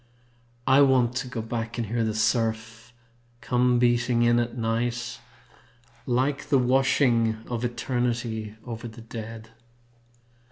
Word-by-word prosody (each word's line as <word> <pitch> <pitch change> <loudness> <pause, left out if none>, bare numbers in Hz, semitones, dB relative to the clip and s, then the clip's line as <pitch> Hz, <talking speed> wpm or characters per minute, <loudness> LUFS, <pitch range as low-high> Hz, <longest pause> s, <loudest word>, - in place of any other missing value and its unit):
I 135 +2 +5
want 130 -3 +4
to 130 0 -3
go 120 -3 -4
back 115 +1 -4
and 120 - -1
hear 115 +2 -1
the 110 -1 -1
surf 110 +1 -1 0.5
Come 125 0 +2
beating 120 0 +2
in 120 0 +4
at 120 +1 -2
night, 120 +1 -2 0.9
Like 135 +3 0
the 140 - +4
washing 125 -3 +2
of 120 -1 -3
eternity 120 -3 -2
over 115 -1 -6
the 115 +1 -11
dead. 115 0 -8
120 Hz, 125 wpm, -26 LUFS, 115-125 Hz, 0.9 s, I